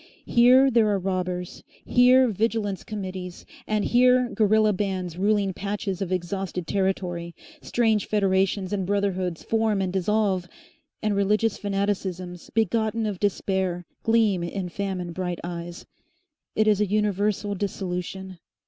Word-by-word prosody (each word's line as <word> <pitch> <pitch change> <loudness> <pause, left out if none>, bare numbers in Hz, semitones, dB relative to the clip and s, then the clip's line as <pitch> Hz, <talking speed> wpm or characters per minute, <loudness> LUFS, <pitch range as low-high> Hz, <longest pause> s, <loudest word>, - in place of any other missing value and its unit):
Here 255 +3 +5
there 230 -2 +4
are 205 - +2
robbers, 180 -1 -3 0.2
here 255 +1 +5
vigilance 215 -2 -1
committees, 185 -4 -6 0.2
and 215 -1 0
here 250 0 +4
guerilla 215 -1 +3
bands 185 -3 -3
ruling 200 +1 +1
patches 200 0 -4
of 190 -2 -3
exhausted 185 0 -3
territory, 180 -2 -2 0.3
strange 220 -3 +1
federations 195 -1 +1
and 190 -3 -1
brotherhoods 190 -4 -1
form 220 -2 +1
and 185 -1 -1
dissolve, 195 -1 +1 0.6
and 210 -1 +1
religious 210 +2 +1
fanaticisms 195 -3 -3
begotten 225 +1 +1
of 205 -4 -3
despair 190 -3 -1 0.2
gleam 225 -5 +2
in 180 +1 -4
famine 185 -2 -4
bright 180 0 -3
eyes. 175 0 -6 0.7
It 215 0 +2
is 210 -1 +3
a 210 - +2
universal 205 0 0
dissolution. 190 -1 -4
195 Hz, 125 wpm, -25 LUFS, 185-215 Hz, 0.7 s, Here